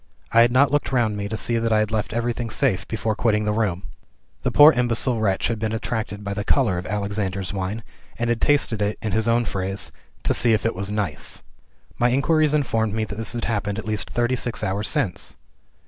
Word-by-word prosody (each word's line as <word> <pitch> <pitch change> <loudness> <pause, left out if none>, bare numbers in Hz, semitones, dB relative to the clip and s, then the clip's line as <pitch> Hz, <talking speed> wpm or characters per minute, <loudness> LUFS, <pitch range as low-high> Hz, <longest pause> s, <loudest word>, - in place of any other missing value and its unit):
I 115 - +6
had 120 +1 +4
not 135 +3 +4
looked 145 -1 0
round 120 -5 +1
me 100 0 -4
to 110 - -3
see 115 +1 +1
that 115 0 -1
I 110 - +4
had 110 0 0
left 110 -2 -1
everything 120 0 -2
safe 110 -7 +1
before 110 0 -2
quitting 105 -1 +1
the 105 - +1
room. 100 -4 -1 0.6
The - - 0
poor 150 +2 +8
imbecile 120 -2 +2
wretch 95 -3 +1
had 115 -2 -2
been 110 0 -2
attracted 110 -2 -3
by 100 0 -3
the 105 +1 -3
color 105 -8 +2
of 90 - -7
"Alexander's 100 -2 -3
Wine," 100 +3 -3 0.3
and 120 - -1
had 120 -1 0
tasted 140 -7 +2
it 105 +1 -1
(in 110 - -2
his 110 +3 0
own 115 +1 +2
phrase) 95 -1 -3 0.3
"to - - +2
see 115 - +3
if 110 - 0
it 115 - +1
was 100 +2 -4
nice." 100 -8 -3 0.6
My 120 - +3
inquiries 150 +4 +2
informed 115 -7 0
me 110 - 0
that 105 -1 -6
this 110 0 0
had 120 - -3
happened 105 -2 -2
at 110 - -5
least 105 -2 -2
thirty 120 +1 0
six 120 -1 -2
hours 105 +1 -1
since! 130 - -1
110 Hz, 225 wpm, -23 LUFS, 105-120 Hz, 0.6 s, poor